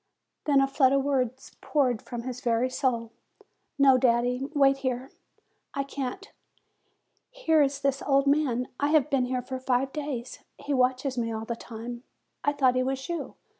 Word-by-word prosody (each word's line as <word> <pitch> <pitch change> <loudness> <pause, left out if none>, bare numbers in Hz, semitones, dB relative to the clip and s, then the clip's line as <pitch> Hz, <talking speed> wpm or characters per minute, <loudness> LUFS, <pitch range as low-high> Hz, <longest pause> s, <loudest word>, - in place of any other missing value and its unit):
Then 285 -2 +4
a 270 - +3
flood 270 -1 +3
of 275 -1 +2
words 260 -2 -2
poured 255 -7 +1
from 240 -1 -6
his 250 -1 -6
very 240 0 +1
soul. 235 -4 -1 0.7
"No, 270 -2 +6
daddy; 250 +2 +1
wait 275 -1 +5
here. 260 0 -3 0.6
I 275 - 0
can't. 275 +8 -5 1.0
Here 410 -12 +2
is 280 0 +1
this 275 -1 0
old 275 -1 +4
man. 275 -4 +1
I 285 - +2
have 300 -1 +3
been 265 -2 +2
here 250 0 -2
for 260 +1 -5
five 260 +1 0
days. 280 -5 -5 0.2
He 290 - -3
watches 255 0 +1
me 230 -1 -1
all 220 0 -4
the 235 - -3
time. 235 +1 -8 0.4
I 285 - +3
thought 265 -3 +3
he 255 - +1
was 265 +1 -2
you. 340 -1 -4
260 Hz, 170 wpm, -27 LUFS, 250-280 Hz, 1.0 s, No